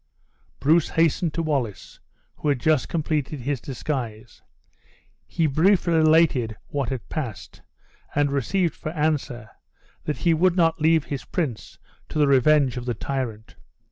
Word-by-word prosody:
Bruce 160 Hz, +4 st, +3 dB
hastened 165 Hz, +1 st, +1 dB
to 165 Hz, -, -1 dB
Wallace, 120 Hz, -, -3 dB, 0.4 s
who 150 Hz, -, -1 dB
had 140 Hz, -3 st, +1 dB
just 155 Hz, +1 st, +1 dB
completed 150 Hz, -3 st, -2 dB
his 135 Hz, -1 st, -2 dB
disguise. 120 Hz, -5 st, -5 dB, 0.9 s
He 165 Hz, -, 0 dB
briefly 170 Hz, +4 st, +3 dB
related 155 Hz, -8 st, +3 dB
what 140 Hz, -4 st, -2 dB
had 130 Hz, -6 st, -5 dB
passed, 115 Hz, -, -6 dB, 0.5 s
and 145 Hz, -1 st, +2 dB
received 160 Hz, +5 st, 0 dB
for -, -, -6 dB
answer, 150 Hz, -7 st, -2 dB, 0.5 s
that 150 Hz, -, -2 dB
he 170 Hz, -, +2 dB
would 175 Hz, +2 st, +2 dB
not 165 Hz, -2 st, +2 dB
leave 160 Hz, -1 st, +4 dB
his 140 Hz, -2 st, -5 dB
prince 145 Hz, -, -4 dB, 0.3 s
to -, -, -5 dB
the 150 Hz, -, +4 dB
revenge 140 Hz, -1 st, +3 dB
of 120 Hz, -, -5 dB
the 120 Hz, -, -1 dB
tyrant. 115 Hz, -3 st, -5 dB
145 Hz, 140 wpm, -24 LUFS, 125-160 Hz, 0.9 s, leave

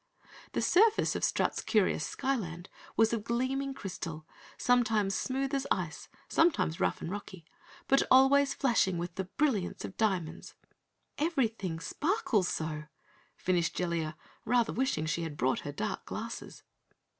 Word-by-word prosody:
The -, -, 0 dB
surface 435 Hz, +4 st, +4 dB
of -, -, -3 dB
Strut's -, -, +1 dB
curious 210 Hz, -5 st, +2 dB
Skyland 190 Hz, -, -3 dB, 0.3 s
was 225 Hz, +1 st, +4 dB
of 225 Hz, -3 st, -1 dB
gleaming 265 Hz, +4 st, -1 dB
crystal, 165 Hz, -6 st, -6 dB, 0.3 s
sometimes 220 Hz, -5 st, +2 dB
smooth 270 Hz, +5 st, -1 dB
as 275 Hz, -1 st, 0 dB
ice, -, -, -2 dB, 0.2 s
sometimes 310 Hz, -, +2 dB
rough 190 Hz, -, 0 dB
and 165 Hz, -, -4 dB
rocky, 190 Hz, -4 st, -7 dB, 0.4 s
but 275 Hz, -, +5 dB
always 275 Hz, +1 st, +6 dB
flashing 225 Hz, -8 st, +2 dB
with 175 Hz, 0 st, -4 dB
the 190 Hz, +2 st, -3 dB
brilliance 215 Hz, -2 st, -1 dB
of -, -, -9 dB
diamonds. 190 Hz, -7 st, -1 dB, 0.6 s
"Everything 230 Hz, -, 0 dB
sparkles 250 Hz, -, 0 dB
so," 155 Hz, -2 st, -3 dB, 0.5 s
finished 175 Hz, -2 st, 0 dB
Jellia, 170 Hz, -3 st, -1 dB, 0.3 s
rather 240 Hz, -2 st, +2 dB
wishing 245 Hz, -11 st, 0 dB
she 170 Hz, +2 st, -1 dB
had 160 Hz, -3 st, -5 dB
brought 130 Hz, +1 st, +1 dB
her 145 Hz, -, -5 dB
dark 110 Hz, -7 st, -4 dB
glasses. -, -, -6 dB
210 Hz, 135 wpm, -31 LUFS, 170-265 Hz, 0.6 s, always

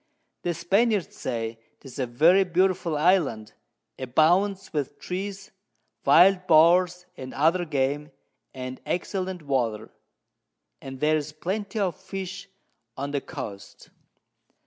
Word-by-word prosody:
The 175 Hz, -1 st, -2 dB
Spaniards 200 Hz, +4 st, +1 dB
say 115 Hz, -2 st, -4 dB, 0.2 s
'tis 135 Hz, -1 st, -11 dB
a 130 Hz, -, 0 dB
very 165 Hz, +11 st, +5 dB
beautiful 180 Hz, -2 st, +1 dB
Island, 145 Hz, -, +1 dB, 0.5 s
abounds 175 Hz, +10 st, +2 dB
with 145 Hz, -4 st, -3 dB
Trees, 195 Hz, +2 st, -5 dB, 0.5 s
wild 180 Hz, +6 st, +5 dB
Boars, 175 Hz, +2 st, +4 dB
and 130 Hz, 0 st, -8 dB
other 165 Hz, +5 st, +2 dB
Game, 145 Hz, 0 st, -1 dB, 0.4 s
and 130 Hz, 0 st, -7 dB
excellent 185 Hz, -1 st, -3 dB
Water; 120 Hz, -7 st, -1 dB, 0.9 s
and 135 Hz, -1 st, -8 dB
there's 155 Hz, 0 st, +1 dB
Plenty 195 Hz, +7 st, -4 dB
of 190 Hz, -6 st, 0 dB
Fish 195 Hz, 0 st, -7 dB, 0.5 s
on 140 Hz, +1 st, -4 dB
the 140 Hz, -1 st, -1 dB
Coast. 110 Hz, -, -9 dB
165 Hz, 110 wpm, -25 LUFS, 135-185 Hz, 0.9 s, very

